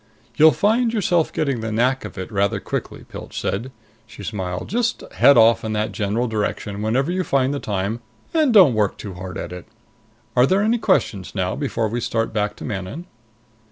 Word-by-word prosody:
"You'll 155 +1 +7
find 225 - +2
yourself 175 -7 +1
getting 140 -6 -1
the 110 0 -4
knack 125 +4 +1
of 105 - -9
it 95 +4 -6
rather 100 -1 +1
quickly," - - -5
Pilch - - -7
said. 115 +7 -3 0.4
She 110 - -11
smiled. 90 -4 -4
"Just 235 +1 -1
head 125 +7 +6
off 115 0 +5
in 110 -1 -2
that 105 0 -1
general 110 +4 -1
direction 105 -2 -3
whenever 130 +9 0
you 185 +1 0
find 135 -3 +1
the 140 - -2
time, 100 +1 -2 0.3
and 310 -5 +3
don't 185 - +7
work 105 -3 0
too 100 -3 -7
hard 90 +1 -7
at - - -6
it. 90 -1 -9 0.7
Are 125 +1 +5
there 195 +5 +2
any 230 +2 +2
questions 105 - 0
now 95 -2 -1
before 135 -6 -1
we 120 +3 -3
start 115 0 -1
back 105 -1 -1
to - - -9
Manon?" 105 - -5
115 Hz, 190 wpm, -21 LUFS, 105-155 Hz, 0.7 s, You'll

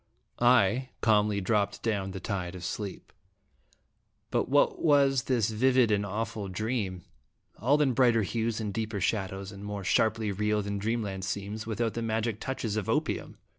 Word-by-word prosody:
I 120 +1 +4
calmly 105 -2 +3
dropped 100 +1 0
down 100 -4 -1
the 95 0 -6
tide 95 -3 -3
of 90 -1 -7
sleep 100 -1 -5 1.2
but - - 0
what 145 +1 +3
was 140 -4 +4
this 115 -5 +1
vivid 125 +1 +3
and 100 -1 +2
awful 105 +1 -3
dream 95 -2 -3 0.6
all 140 +7 +3
in 135 -3 +2
brighter 120 -3 +4
hues 115 +3 -1
and 105 -3 -3
deeper 110 -1 -2
shadows, 95 0 -2
and 100 0 -10
more 105 -1 -5
sharply 110 +2 +2
real 105 +1 0
than 100 0 -3
Dreamland 105 -3 -2
seems, 100 +2 -4
without 115 0 -1
the 115 - -3
magic 110 -1 -1
touches 115 -5 -3
of 105 - -2
opium? - - -1
110 Hz, 160 wpm, -29 LUFS, 100-115 Hz, 1.2 s, I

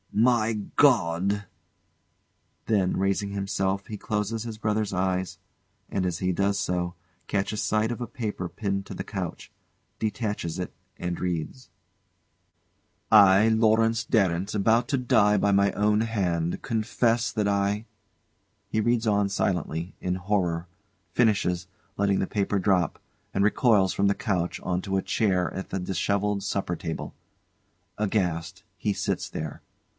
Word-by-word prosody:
] - - -28 0.2
My 115 -2 +1 0.2
God! 100 - +3 1.2
[Then, 100 -4 +1
raising 100 +1 0
himself, 100 0 -1
he 105 - -6
closes 105 +2 -2
his 115 -2 -6
brother's 105 -2 -1
eyes, 95 -1 -1 0.5
and 95 -2 -1
as 90 -3 -1
he 90 0 +1
does 100 +2 +1
so, 90 -1 -1 0.3
catches 100 +1 -1
sight 110 +2 +1
of 120 - -5
a 120 - -3
paper 105 -6 -4
pinned 100 -2 -2
to - - -7
the - - -4
couch; 95 -5 -5 0.5
detaches 105 -6 -2
it 90 - -4 0.2
and 90 -1 -3
reads:] 90 +8 -3 1.4
"I, 100 0 +7
Lawrence 115 0 +3
Darrant, 95 -4 +1
about 110 +3 +3
to 140 - +2
die 110 -5 +3
by 100 - +2
my 100 0 +4
own 105 +1 +2
hand 90 -7 -1
confess 115 +1 +1
that 105 -2 0
I 100 +2 0 0.4
" - - -45
[He 110 - +1
reads 120 0 +1
on 100 -1 +2
silently, 90 -3 -1
in 90 0 -1
horror; 90 -3 -1 0.5
finishes, 95 -6 +2 0.3
letting 100 -1 +2
the 95 - 0
paper 100 -1 0
drop, 95 -2 +1 0.3
and 100 - +2
recoils 105 -4 +3
from 100 - +2
the 100 - +2
couch 95 -9 -1
on 90 0 -1
to 95 0 -1
a - - +1
chair 90 -5 +1
at 95 - -5
the 95 - -2
dishevelled 100 +3 0
supper 95 -3 -1
table. 80 -1 -5 0.8
Aghast, 90 -3 -1
he 105 - 0
sits - - -2
there. 75 -2 -6
100 Hz, 145 wpm, -26 LUFS, 90-110 Hz, 1.4 s, I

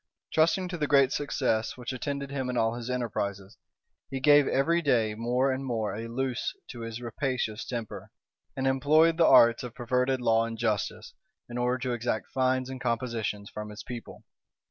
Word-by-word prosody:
Trusting 165 +4 +3
to 175 -2 -5
the 150 - 0
great 140 -2 +5
success 125 -6 -1
which 125 +1 -5
attended 140 +2 -4
him 135 -2 -2
in 125 - -2
all 115 0 +2
his 120 0 -6
enterprises, 100 -5 -3 0.5
he 135 - -3
gave 145 +1 +6
every 165 +5 +2
day 120 -8 +2
more 125 +4 +1
and 130 +1 -3
more 110 -6 -2
a 115 +2 -5
loose 125 +1 -2 0.2
to 120 - -9
his 115 0 -5
rapacious 120 -2 -2
temper, 115 -3 -6 0.5
and 130 - -1
employed 155 +5 +4
the 170 - +5
arts 115 0 +6
of 125 -2 -7
perverted 125 +1 0
law 115 -2 +3
and 115 0 -6
justice, 110 -4 -2 0.3
in 120 +1 -5
order 125 +1 +1
to 125 -1 -2
exact 120 -2 -2
fines 130 0 +1
and 130 -1 -7
compositions 115 -4 -2
from 105 0 -6
his 105 +2 -9
people. 120 -2 -8
125 Hz, 180 wpm, -28 LUFS, 115-135 Hz, 0.5 s, gave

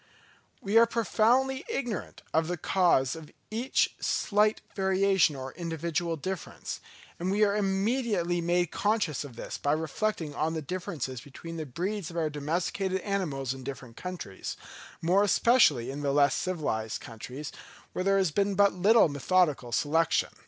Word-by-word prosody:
We 205 +3 +4
are 230 - +6
profoundly 245 +4 +2
ignorant 245 - -4
of 160 0 +2
the 175 +1 -2
cause 165 -7 +2
of 160 -2 -10 0.2
each 235 +4 +1
slight 210 +1 +2 0.2
variation 190 -4 +3
or 130 0 -6
individual 170 0 -2
difference; 185 +4 -5 0.4
and 180 +2 -1
we 205 +2 +3
are 200 -1 +3
immediately 195 -3 0
made 175 0 +1
conscious 205 - 0
of 135 -5 -10
this - - -6
by 145 - +1
reflecting 160 0 -2
on 160 +3 -1
the 160 - -2
differences 145 -7 -4
between 165 +4 -9
the 155 -2 -4
breeds 185 - -3
of 170 - -7
our 155 -2 0
domesticated 180 +6 -1
animals 150 -11 -2
in 135 -1 -9
different 125 -3 -7
countries, 175 - -6 0.5
more 180 +4 +4
especially 200 - +4
in 140 +2 -5
the 140 -1 0
less 140 -1 +4
civilized 145 -12 -2
countries, 125 +6 -8 0.4
where 185 - -2
there 195 +1 +3
has 190 -5 +2
been 200 +4 +1
but 200 +1 +5
little 205 +5 +5
methodical 145 -3 +1
selection. 155 +6 +2
175 Hz, 150 wpm, -29 LUFS, 145-200 Hz, 0.5 s, are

